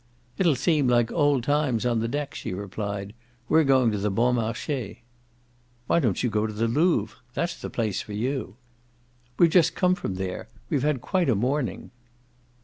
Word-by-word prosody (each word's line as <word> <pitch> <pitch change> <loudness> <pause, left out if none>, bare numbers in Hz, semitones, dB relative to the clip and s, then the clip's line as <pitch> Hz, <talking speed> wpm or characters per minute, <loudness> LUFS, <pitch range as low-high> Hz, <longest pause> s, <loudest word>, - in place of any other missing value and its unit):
"It'll 170 -6 +4
seem 145 +1 +2
like 120 -2 +3
old 145 -5 +2
times, 145 -4 +1
on 120 -2 +1
the 115 - -1
deck," 145 +3 -3
she 90 - -5
replied. 100 0 -5 0.3
"We're 160 +4 +4
going 130 -4 +4
to 105 - -2
the 105 +1 0
Bon 120 +5 +2
Marche." 115 +1 -2 0.9
"Why 170 - +3
don't 115 - 0
you 125 - +2
go 105 +1 +1
to 110 - -6
the 115 +2 0
Louvre? 155 +9 +1 0.2
That's 170 +1 -2
the - - -5
place 110 -4 -1
for 105 - -9
YOU." 125 +3 -3 0.8
"We've 170 -2 +5
just 165 -2 +4
come 180 -1 +3
from 135 - -4
there: 95 -1 -4 0.2
we've 135 - +1
had 145 -3 0
quite 180 +1 0
a 120 - +3
morning." 130 +5 -2
125 Hz, 180 wpm, -25 LUFS, 110-150 Hz, 0.9 s, We've